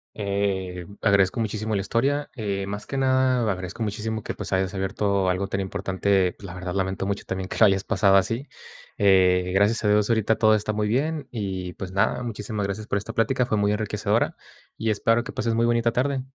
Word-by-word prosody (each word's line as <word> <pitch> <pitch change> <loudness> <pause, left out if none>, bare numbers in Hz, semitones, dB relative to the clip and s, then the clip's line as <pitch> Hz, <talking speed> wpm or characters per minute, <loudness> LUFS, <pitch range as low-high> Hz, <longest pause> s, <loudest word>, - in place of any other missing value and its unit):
eh, 95 -3 -2 0.2
agradezco 100 0 +3
muchísimo 110 -1 -2
la 100 - 0
historia. 140 +8 0
Eh, 100 -4 -2
más 105 +1 -6
que 135 - -4
nada, 130 -3 +2
agradezco 95 +4 -5
muchísimo 110 +1 -3
que, - - -4
pues, - - -7
hayas 95 +1 0
abierto 95 0 0
algo 90 +2 0
tan 95 - -2
importante. 95 0 0
Pues - - -20
la 85 - -8
verdad, 90 -1 -5
lamento 95 0 -1
mucho 100 0 -3
también 95 0 -4
que - - -6
lo 110 - +8
hayas 95 0 +1
pasado 100 -1 +3
así. 115 +8 +1 0.5
Eh, 90 -2 +4
gracias 105 +4 +2
a - - +2
Dios, 105 +1 +3
ahorita 110 -1 +2
todo 110 -1 +4
está 105 0 -1
muy 105 0 0
bien. 145 +5 -1
Y, 95 -6 -4
pues 95 +1 -7
nada, 100 +6 +1
muchísimas 105 -2 -4
gracias 100 +2 -4
por 100 - 0
esta 105 +3 -5
plática, 125 +3 +1
fue 110 - 0
muy 105 0 +2
enriquecedora, 105 0 0 0.4
y 110 - 0
espero 115 +2 +2
que - - -7
pases 115 0 -1
muy 115 +1 +2
bonita 115 0 +2
tarde. 130 +2 0
105 Hz, 205 wpm, -24 LUFS, 95-115 Hz, 0.5 s, lo